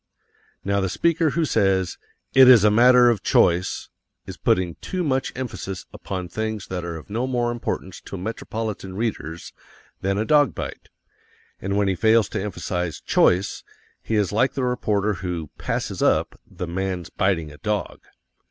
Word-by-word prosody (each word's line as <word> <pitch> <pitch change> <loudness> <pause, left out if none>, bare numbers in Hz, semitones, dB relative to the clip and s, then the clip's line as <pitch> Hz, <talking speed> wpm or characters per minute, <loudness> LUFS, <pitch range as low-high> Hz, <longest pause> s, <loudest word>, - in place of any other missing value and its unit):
Now 100 0 +1
the 95 - 0
speaker 165 - +2
who 165 +2 0
says 95 - +1 0.3
"IT 130 -1 +8
IS 120 -5 +8
A 105 - +5
MATTER 120 +2 +6
OF 110 - -2
CHOICE" 90 +2 +2 0.4
is - - -7
putting 90 -2 +1
too 185 -1 -3
much 135 -4 0
emphasis 110 -7 -5
upon 95 -2 -5
things 110 +1 -3
that 90 -1 -3
are 85 -1 -4
of 80 - -9
no 120 +4 -1
more 120 -2 0
importance 105 -5 -4
to 100 - -6
metropolitan 110 -1 -5
readers 95 -7 -4 0.5
than 95 +1 0
a 110 - 0
dog 145 -2 +4
bite, - - -6 0.7
and 100 +1 -1
when 100 -1 +2
he 95 - +2
fails 110 +2 +3
to - - -3
emphasize 90 -3 -3
"choice" 95 +3 +2 0.4
he 110 - -2
is 105 -3 +1
like 120 +6 +2
the 135 - -2
reporter 105 -4 0
who 85 -5 -4
"passes - - -3
up" - - +2 0.2
the 90 - -5
man's 90 0 -3
biting 90 -6 0
a 75 - -14
dog. 105 +4 -2
100 Hz, 165 wpm, -23 LUFS, 95-120 Hz, 0.7 s, IT